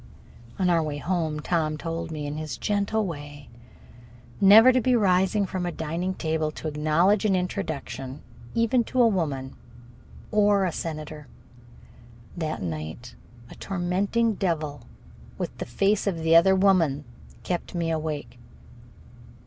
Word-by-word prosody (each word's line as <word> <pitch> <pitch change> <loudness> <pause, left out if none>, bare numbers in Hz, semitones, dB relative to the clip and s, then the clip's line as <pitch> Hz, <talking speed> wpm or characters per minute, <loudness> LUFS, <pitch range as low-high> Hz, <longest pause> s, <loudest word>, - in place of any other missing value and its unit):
On 185 - +1
our 170 -2 +3
way 150 -2 -3
home, 160 -2 -2
Tom 155 -2 0
told 165 +1 -4
me, 155 -2 -5
in 145 0 -4
his 155 0 -5
gentle 210 +1 0
way, 145 -4 -8 0.9
never 215 +6 +9
to 255 0 +3
rise 190 -1 +2
from 185 -1 -4
a 175 - -2
dining 170 +4 -3
table 160 -2 -1
to 155 - -6
acknowledge 155 +7 +2
an 205 -3 +2
introduction 145 -8 -4 0.3
even 230 +1 +2
to 255 - -2
a 240 - +7
woman 145 -10 -2 0.8
or 205 -2 +3
a 180 - 0
senator. 155 -2 -6 1.1
That 155 - -3
night 80 +8 -6 0.4
a - - -8
tormenting 195 +5 0
devil 155 - -3 0.5
with - - -4
the - - -4
face 195 - +1
of 170 -5 -1
the 165 0 +4
other 190 +3 +6
woman 175 -7 +3 0.4
kept 180 +1 -3
me 165 -1 -1
awake. 155 -5 -4
170 Hz, 135 wpm, -25 LUFS, 150-195 Hz, 1.1 s, never